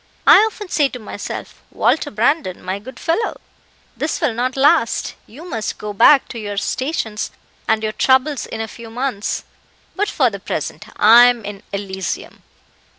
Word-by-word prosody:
I - - +9
often 415 -2 -9
say 295 -5 +2
to 250 - -7
myself, 210 -3 -7
'Walter 300 - +1
Brandon, 225 - 0
my 185 +2 -3
good 250 +4 -11
fellow, 340 +7 -1 0.6
this - - -2
will 295 -9 +1
not 250 +3 -2
last; 250 -4 +3
you 300 +10 -12
must 225 -10 -3
go 210 0 -6
back 260 +6 +6
to 235 - -6
your 205 -2 -5
stations 220 -3 -2 0.4
and 220 0 +1
your 215 - 0
troubles 260 +4 +2
in 225 - -5
a 225 - -3
few 230 +1 -11
months;' 240 -3 -3 0.5
but 415 +1 0
for 255 -5 +2
the 200 - -6
present 210 - -4
I 230 +3 +8
am 240 -3 +2
in 200 -1 -7
Elysium." 190 -3 -5
230 Hz, 165 wpm, -19 LUFS, 210-270 Hz, 0.6 s, I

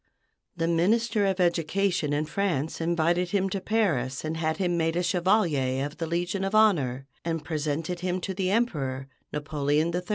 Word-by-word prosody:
The 165 -1 0
Minister 210 +5 +2
of 190 -1 -1
Education 175 -1 +1
in 145 +1 0
France 160 -3 -1
invited 170 +1 +1
him 195 0 0
to 195 - -2
Paris 155 - 0
and 155 +1 -2
had 160 -1 -1
him 175 -2 0
made 165 -1 0
a 175 - +1
Chevalier 170 -8 +1
of 145 +2 -7
the 165 - -2
Legion 175 +3 -1
of 195 +2 -1
Honor, 140 - +3 0.2
and 165 -2 -3
presented 155 +2 -2
him 180 +1 -1
to 190 - -3
the 185 0 -1
Emperor, 140 - -1 0.2
Napoleon 150 +2 0
III. 180 - 0
170 Hz, 170 wpm, -27 LUFS, 150-190 Hz, 0.2 s, Honor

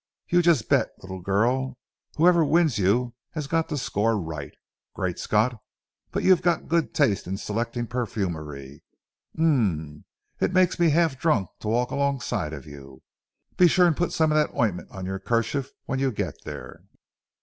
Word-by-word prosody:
You 175 0 +4
just 170 -10 +3
bet, - - +3
little 95 0 -7
girl, 120 +7 0 0.4
whoever 170 +1 +5
wins 155 -6 +2
you 120 +6 +2 0.2
has 155 -3 -3
got 165 +3 0
to 150 - -2
score 115 -3 0
right. 80 -5 -6 0.4
Great - - -2
Scott! 110 +2 +1 0.5
but - - -3
you 185 - +7
have 175 -1 0
good 165 -8 0
taste 100 -4 +2
in 95 +2 -3
selecting 115 +3 -3
perfumery. 80 - -4 0.6
Um 95 - 0 0.4
ee! - - +4
it - - -2
makes 185 -1 +3
me 170 -1 +5
half 155 -3 +2
drunk 115 - +1
to - - -7
walk 120 +3 +1
alongside 135 - -1
of 70 -4 -8
you. 70 -2 -12 0.5
Be 180 - +7
sure 180 +2 +4
and 170 -3 +3
put 175 +3 -1
some 160 -1 +2
of - - +2
that 150 - 0
ointment 105 -7 0
on 95 -1 -7
your 95 +1 -3
kerchief 120 +6 -1 0.2
when 135 - -2
you 135 -1 +1
get 100 - -3
there." - - -8
120 Hz, 170 wpm, -25 LUFS, 95-155 Hz, 0.6 s, you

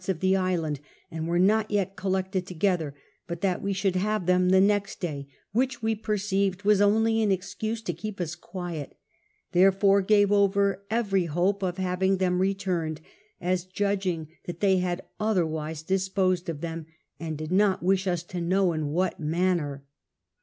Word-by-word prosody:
s 185 - -9
of 185 -4 0
the 190 +2 +3
island, 170 -6 0 0.3
and 160 0 -4
were 170 +1 +1
not 210 +4 +3
yet 195 -2 0
collected 190 -1 -1
together, 175 -5 0 0.3
but 170 0 -5
that 190 -3 0
we 200 - -1
shouhl 195 -1 0
have 210 +1 0
tln 180 - -3
in 180 0 +2
the 190 +1 +5
next 200 +1 +2
day; 145 -6 -4 0.2
which 255 +2 0
we 220 0 +1
jx'rceived 200 -2 -1
was 205 -1 +4
only 225 +2 +3
an 210 -2 +2
excuse 210 +4 -3
to 175 - -2
keep 195 +5 -7
us 170 -2 -2
quiet, 175 -4 -7 0.5
therefore 195 +2 +4
gave 205 0 +4
over 200 -1 +2
every 200 -5 +1
hope 180 +5 0
of 180 -1 -2
having 190 +1 +1
them 180 -1 +1
ivturiied, 185 -5 -1 0.4
as 180 0 0
judging 185 -3 -1 0.2
that 175 -1 -6
they 195 -2 +3
had 180 0 -1 0.2
otherwise 160 -7 -1
disposed 190 0 0
them, 165 0 -5 0.3
and 160 -2 -4
did 155 +2 -6
not 195 -1 +3
wish 190 +1 +2
us 175 -2 0
to 175 0 -5
know 185 +1 +2
in 155 -2 -2
what 175 +4 -1
inaiiner. 160 -3 0
185 Hz, 170 wpm, -27 LUFS, 175-200 Hz, 0.5 s, the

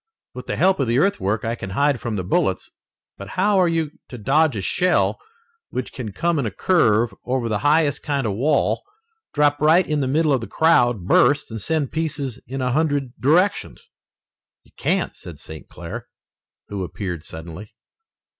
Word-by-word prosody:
With - - -9
the - - -2
help 190 -2 +3
of 135 - +1
the 120 +2 +1
earthwork 110 - +1
I 115 - -1
can 105 -5 -6
hide 140 +5 +1
from 115 -2 -3
the 95 - -2
bullets, 90 - 0 0.5
but 100 - -7
how 205 -1 +3
are 180 - +4
you 165 -3 -1 0.2
to 125 - -8
dodge 140 +5 +2
a 100 - -2
shell 180 - +1 0.5
which 130 - -5
can 115 -5 -6
come 170 - 0
in 130 - -1
a - - -1
curve 115 - +2
over 125 -1 -1
the 105 -2 -1
highest 145 +3 +2
kind 140 -4 -1
of 105 - 0
a - - -4
wall, 140 +6 +1 0.5
drop 145 -1 +2
right 160 +4 +5
in 150 -1 -1
the 135 - 0
middle 150 +2 +2
of 130 - +1
the 115 - -6
crowd, 120 - +2
burst, 130 +7 +3
and 110 -1 -5
send 155 +3 -1
pieces 145 -6 -3
in 130 +1 -4
a 125 - 0
hundred 145 -3 0
directions?" 175 +9 +1 0.7
"You - - -25
can't," - - -1
said 85 -3 -10
St. 80 +1 -11
Clair, - - -8 0.6
who 100 -2 -4
appeared 90 -3 -5
suddenly. 85 +7 -10
135 Hz, 185 wpm, -22 LUFS, 110-155 Hz, 0.7 s, right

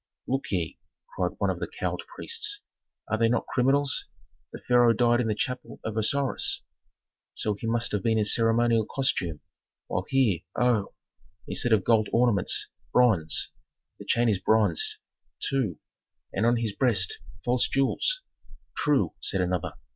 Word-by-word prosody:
"Look - - -2
ye!" - - -2 0.4
cried - - -1
one - - +1
of - - -5
the - - -3
cowled - - -4
priests, 425 -3 -1 0.5
"are 110 - -1
they 115 0 +3
not 120 - 0
criminals? 135 +2 +1 0.4
The - - -7
pharaoh 120 -1 +4
died 120 +1 +3
in 115 - -1
the 110 - 0
chapel 125 +3 -4
of 110 - -4
Osiris, 130 +5 +1 0.7
so 105 - -1
he 105 +3 -6
must 115 0 0
have 105 - -1
been 110 +2 +1
in 105 - +2
ceremonial 115 0 +3
costume, 90 - -1 0.4
while 90 - -3
here 125 -10 +2 0.2
oh! 120 -5 +1 0.5
instead 125 - 0
of 105 -4 +4
gold 110 -2 +3
ornaments 115 -5 +2 0.2
bronze; 105 -11 +3 0.5
the - - -10
chain 120 +1 +2
is 105 -4 +2
bronze, 430 - +2 0.4
too, 125 - -1 0.6
and 110 +4 +1
on 120 0 +3
his 115 -3 -2
breast 105 -8 +2 0.3
false 125 0 +3
jewels!" - - 0 0.5
"True," 145 -2 +1
said 95 - +1
another. 90 -1 -2
115 Hz, 150 wpm, -27 LUFS, 105-125 Hz, 0.7 s, pharaoh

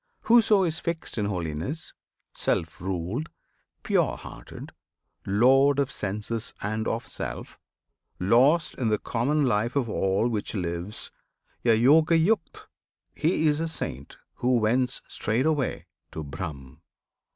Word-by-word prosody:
Whoso 225 -4 +5
is 165 -2 -1
fixed 165 -7 -4
in 105 - 0
holiness, 90 - -3 0.4
self 80 -1 -1
ruled, 95 - -3 0.5
Pure - - +1
hearted, - - -10 0.6
lord 135 +7 +5
of 140 -1 +1
senses 105 +3 -4
and 110 +2 -2
of 115 +1 -2
self, - - -7 0.6
Lost 135 - +4
in 125 - 0
the 105 - +2
common 140 +8 0
life 115 +1 +1
of 135 -4 +1
all 95 +1 +1
which 110 -2 -3
lives 90 +2 -4 0.5
A 115 -2 +4
"Yogayukt" 160 - +3 0.5
he 160 0 +1
is 150 -1 +3
a 165 - -1
Saint 70 - -5 0.2
who 125 0 +2
wends 125 +3 +1
Straightway 130 +6 0 0.3
to 80 - -5
Brahm. 70 0 -7
115 Hz, 120 wpm, -26 LUFS, 100-150 Hz, 0.6 s, Whoso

